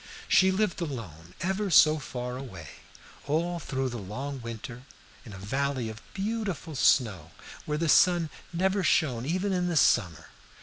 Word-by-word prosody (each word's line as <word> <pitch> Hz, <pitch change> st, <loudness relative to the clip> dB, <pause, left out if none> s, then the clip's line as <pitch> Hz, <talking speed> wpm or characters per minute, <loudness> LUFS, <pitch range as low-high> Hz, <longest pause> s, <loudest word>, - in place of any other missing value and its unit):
She 190 Hz, 0 st, +5 dB
lived 190 Hz, -2 st, 0 dB
alone, 90 Hz, -, -7 dB
ever 190 Hz, +2 st, -1 dB
so 155 Hz, -2 st, +6 dB
far 125 Hz, -2 st, -5 dB
away, 95 Hz, -, -8 dB, 0.6 s
all 170 Hz, +4 st, 0 dB
through 135 Hz, -4 st, -2 dB
the 120 Hz, -1 st, -5 dB
long 130 Hz, +8 st, -6 dB
winter, 115 Hz, +1 st, -7 dB, 0.5 s
in -, -, -9 dB
a 100 Hz, -, -9 dB
valley 130 Hz, +4 st, -2 dB
of 110 Hz, 0 st, -9 dB
beautiful 195 Hz, -6 st, -3 dB
snow, 105 Hz, -, +2 dB, 0.4 s
where 150 Hz, 0 st, -1 dB
the 165 Hz, +1 st, 0 dB
sun 170 Hz, 0 st, +4 dB, 0.2 s
never 190 Hz, +3 st, +1 dB
shone 130 Hz, -8 st, +1 dB
even 185 Hz, +4 st, 0 dB
in 180 Hz, -1 st, 0 dB
the 170 Hz, -2 st, 0 dB
summer. 90 Hz, -, +2 dB
140 Hz, 155 wpm, -28 LUFS, 115-175 Hz, 0.6 s, so